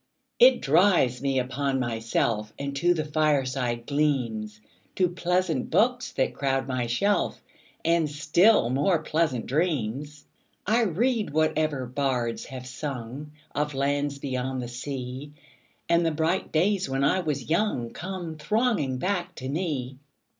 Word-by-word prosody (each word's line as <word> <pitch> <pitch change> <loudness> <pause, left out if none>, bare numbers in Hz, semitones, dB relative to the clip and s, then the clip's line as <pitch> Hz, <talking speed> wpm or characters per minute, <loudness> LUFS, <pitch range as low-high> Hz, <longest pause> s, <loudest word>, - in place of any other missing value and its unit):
It 255 +1 +6
drives 150 -6 +3
me 135 -1 0
in 125 - +1
upon 135 +1 -1
myself 115 -2 -1
5 110 - -25
And 140 0 -4
to 175 +4 +3
the 155 -2 -2
fireside 135 -6 0
gleams, 120 -8 -1 0.4
To 185 - +3
pleasant 175 -4 0
books 245 +2 +2
that 130 - 0
crowd 135 -1 -1
my 130 -2 -1
shelf, 200 - 0 0.4
And 165 -2 +3
still 155 - +3
more 145 +7 +2
pleasant 155 -8 0
dreams. 145 -2 -2 0.4
I 230 +2 +3
read 220 +4 +1
whatever 155 -3 +1
bards 125 -2 -1
have 130 -1 -8
sung 135 +1 -6 0.2
Of 150 -1 -1
lands 140 +1 0
beyond 130 -1 -3
the - - -5
sea, 130 +2 -6 0.5
10 170 - +4
And - - +1
the - - +1
bright 160 +4 0
days 185 +1 +1
when 135 +1 0
I 165 +7 +3
was 150 -5 -3
young 165 - 0
Come 175 -3 -6
thronging 210 - 0
back 180 +3 -2
to 130 - -6
me. 140 -5 -3
145 Hz, 145 wpm, -26 LUFS, 130-170 Hz, 0.5 s, It